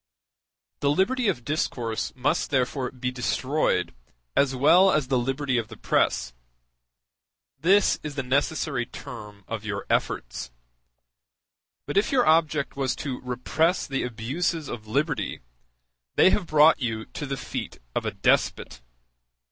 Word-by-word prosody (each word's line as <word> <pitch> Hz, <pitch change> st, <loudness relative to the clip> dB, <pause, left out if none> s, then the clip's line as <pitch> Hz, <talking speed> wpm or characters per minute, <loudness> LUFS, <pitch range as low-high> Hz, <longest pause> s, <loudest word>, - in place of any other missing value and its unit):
The 140 Hz, -, +1 dB
liberty 225 Hz, -, +2 dB
of 125 Hz, -12 st, -1 dB
discourse 120 Hz, -7 st, -2 dB
must 130 Hz, +2 st, 0 dB
therefore 130 Hz, -1 st, 0 dB
be 125 Hz, 0 st, -4 dB
destroyed 125 Hz, -4 st, 0 dB, 0.4 s
as 135 Hz, -1 st, +3 dB
well 175 Hz, +9 st, +6 dB
as 150 Hz, -6 st, +1 dB
the 130 Hz, -, +2 dB
liberty 135 Hz, 0 st, 0 dB
of 110 Hz, -, -4 dB
the 110 Hz, -1 st, -11 dB
press; -, -, +1 dB, 1.3 s
this 195 Hz, +5 st, +4 dB
is 150 Hz, -2 st, -6 dB
the 135 Hz, -, -2 dB
necessary 135 Hz, -1 st, 0 dB
term 105 Hz, -8 st, -10 dB
of 115 Hz, -2 st, -4 dB
your 100 Hz, -2 st, -4 dB
efforts; -, -, -1 dB, 1.4 s
but 145 Hz, -, -3 dB
if 200 Hz, -, +3 dB
your 255 Hz, -3 st, +3 dB
object 155 Hz, -2 st, +2 dB
was 135 Hz, -2 st, -1 dB
to 135 Hz, -4 st, -5 dB
repress 130 Hz, +8 st, 0 dB
the 135 Hz, -1 st, -2 dB
abuses 135 Hz, +7 st, -2 dB
of 110 Hz, -2 st, -7 dB
liberty, 140 Hz, +5 st, -1 dB, 0.7 s
they 190 Hz, -, +6 dB
have 195 Hz, -5 st, 0 dB
brought 155 Hz, 0 st, +5 dB
you 110 Hz, -3 st, -2 dB
to 145 Hz, -, -7 dB
the 135 Hz, 0 st, -3 dB
feet 125 Hz, -, -5 dB, 0.2 s
of -, -, -1 dB
a -, -, -1 dB
despot. -, -, 0 dB
135 Hz, 140 wpm, -26 LUFS, 120-155 Hz, 1.4 s, well